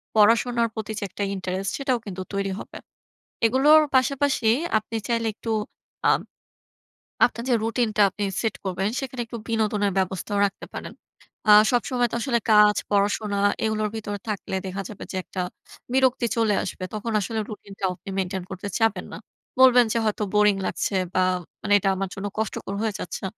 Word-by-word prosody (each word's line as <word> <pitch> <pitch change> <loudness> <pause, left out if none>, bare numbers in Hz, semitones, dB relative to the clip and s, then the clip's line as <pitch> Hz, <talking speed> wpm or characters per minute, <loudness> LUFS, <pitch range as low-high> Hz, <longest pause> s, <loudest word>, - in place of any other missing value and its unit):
পড়াশোনার 230 +2 +4
প্রতি 220 -1 -4
যে - - -5
একটা 200 - -4
ইন্টারেস্ট 190 +1 -3
সেটাও 270 -3 0
কিন্তু 190 -2 -6
তৈরি 195 0 -1
হবে। - - -9 0.7
এগুলোর 290 +6 +6
পাশাপাশি 270 -2 +2 0.3
আপনি 220 +2 -6
চাইলে 230 -1 +1
একটু 225 - -6 0.6
আব - - +3 1.1
আপনার 235 -1 -4
যে 245 - +4
রুটিনটা 225 -1 +1
আপনি 205 +2 -5 0.2
সেট 225 -3 -1
করবেন 190 +1 -1
সেখানে 260 -2 -4
একটু 235 +1 -7
বিনোদনের 215 -3 +1
ব্যবস্থাও 190 +2 -2
রাখতে 195 - -5
পারেন। - - -7 0.6
আ - - +9 0.2
সবসময় 245 0 +1
তো - - -2
আসলে 240 -1 +1
কাজ, 210 0 +7 0.2
পড়াশোনা, 205 0 +1 0.3
এগুলোর 215 -1 0
ভিতরে 205 -2 -4
থাকলে 200 -2 -3
দেখা 190 +1 -4
যাবে 210 - -8
যে - - -6
একটা 185 - -5 0.5
বিরক্তি 260 -2 +3
চলে 220 -3 +3
আসবে। - - -6
তখন 220 +2 -3
আসলে 220 +3 -3
রুটিনটাও 200 -2 -4
আপনি 195 - -11
মেইনটেইন 190 -1 -2
করতে 190 +2 -5
চাবেন 225 -5 +1
না। - - -6 0.4
বলবেন 250 -2 +7
যে - - 0
হয়তো 215 0 0
বোরিং 210 -1 +5
লাগছে 200 - -2 0.2
বা 185 - +3 0.4
মানে 205 - +1
এটা 195 - +1
আমার 195 0 -3
জন্য 200 0 -4
কষ্টকর 210 -2 -3
হয়ে 220 -2 0
যাচ্ছে। 180 - -6
215 Hz, 165 wpm, -24 LUFS, 200-235 Hz, 1.1 s, আ